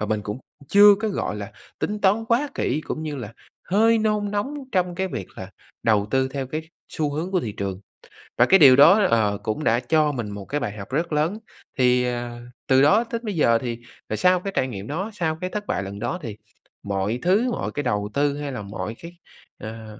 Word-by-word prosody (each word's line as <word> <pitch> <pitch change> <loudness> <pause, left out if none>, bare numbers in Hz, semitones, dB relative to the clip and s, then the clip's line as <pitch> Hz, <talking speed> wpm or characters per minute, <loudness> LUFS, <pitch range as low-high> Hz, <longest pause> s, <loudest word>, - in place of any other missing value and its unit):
và 105 - -1
mình 110 -1 -1
cũng 105 +3 -5 0.3
chưa 205 0 +8
có, 220 - 0
gọi 150 - -3
là, 105 -1 -7 0.3
tính 210 0 -2
toán 210 +3 +2
quá 245 +6 +1
kỹ, 145 +5 -1
cũng 155 - -4
như 150 -2 -4
là 115 -3 -7 0.3
hơi 225 +4 +3
nôn 210 -1 0
nóng 210 +8 -2 0.2
trong 180 -2 +1
cái 190 +1 -2
việc 95 - -5
là 95 +1 -8 0.3
đầu 105 -2 +3
tư 130 0 +2
theo 135 -1 -4
cái 155 +4 -5 0.2
xu 150 -2 -1
hướng 165 +5 -3
của 185 - +2
thị 110 -9 -4
trường. 100 -1 -4 0.6
Và 120 - +6
cái 195 +5 +5
điều 135 -4 +9
đó, 195 +9 +7
ờ, 105 -3 +2
cũng 110 +8 -2
đã 115 -2 +3
cho 150 +3 +2
mình 120 -6 -4
một 100 -1 -7
cái 145 - -2
bài 105 -2 -4
học 100 - -8
rất 165 +3 -1
lớn, 160 +8 0 0.4
thì, 125 -1 +3
ờ, 120 -1 -4 0.3
từ 130 0 +5
đó 200 +11 +5
đến 230 0 -2
bây 210 -4 -3
giờ 115 -7 +3
thì 120 -2 -4 0.3
là - - -1
sau 180 0 +3
cái 195 +2 -5
trải 130 - +1
nghiệm 100 -3 -7
đó, 190 +9 -3
sau 160 -5 -2
cái 185 - -2
thất 210 +1 -5
bại 95 - -1
lần 100 +1 -7
đó 120 +11 -3
thì 110 -5 -7 0.5
mọi 100 +4 -2
thứ, 215 +8 +2
mọi - - -3
cái 145 - -3
đầu 105 -4 -1
tư, 145 +2 +1
hay 145 -1 -4
là 125 -5 -5
mọi 105 +2 -6
cái, 170 +1 -10 0.5
ờ, 110 -1 -9
140 Hz, 230 wpm, -23 LUFS, -, 0.6 s, điều